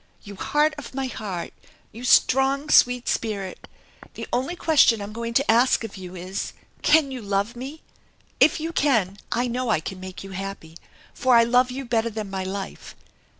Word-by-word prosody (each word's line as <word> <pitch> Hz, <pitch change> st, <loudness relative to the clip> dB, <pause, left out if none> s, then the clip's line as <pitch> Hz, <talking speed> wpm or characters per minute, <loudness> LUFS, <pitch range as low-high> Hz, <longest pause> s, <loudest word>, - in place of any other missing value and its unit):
You 200 Hz, -1 st, -10 dB
heart 300 Hz, +9 st, +1 dB
of 270 Hz, -, -10 dB
my 270 Hz, -1 st, -1 dB
heart! 205 Hz, -8 st, -5 dB, 0.4 s
You 230 Hz, +3 st, -10 dB
strong, 270 Hz, +3 st, +3 dB
sweet 245 Hz, 0 st, +4 dB
spirit! 200 Hz, -4 st, -3 dB, 0.5 s
The -, -, -6 dB
only 265 Hz, +8 st, -1 dB
question 300 Hz, -9 st, +4 dB
I'm 205 Hz, +1 st, -7 dB
going 230 Hz, +1 st, -5 dB
to 275 Hz, -2 st, +3 dB
ask 240 Hz, +1 st, +3 dB
of 220 Hz, -2 st, -7 dB
you 185 Hz, -1 st, -9 dB
is, 185 Hz, +2 st, -5 dB, 0.3 s
Can 295 Hz, -3 st, +4 dB
you 255 Hz, -2 st, -5 dB
love 200 Hz, +3 st, -1 dB
me? 270 Hz, +6 st, -8 dB, 0.6 s
If 310 Hz, -, +5 dB
you 325 Hz, +2 st, -3 dB
can, 215 Hz, -, +1 dB
I 245 Hz, -, +1 dB
know 245 Hz, 0 st, -2 dB
I 210 Hz, -, +3 dB
can 185 Hz, +4 st, -7 dB
make 185 Hz, 0 st, -8 dB
you 195 Hz, -, -9 dB
happy, 190 Hz, -4 st, -7 dB, 0.4 s
for 255 Hz, -1 st, +3 dB
I 230 Hz, -, +7 dB
love 245 Hz, +2 st, +3 dB
you 265 Hz, +2 st, -5 dB
better 230 Hz, -1 st, 0 dB
than 215 Hz, -3 st, -6 dB
my 190 Hz, -1 st, -3 dB
life. 190 Hz, +1 st, -6 dB
230 Hz, 185 wpm, -24 LUFS, 195-260 Hz, 0.6 s, I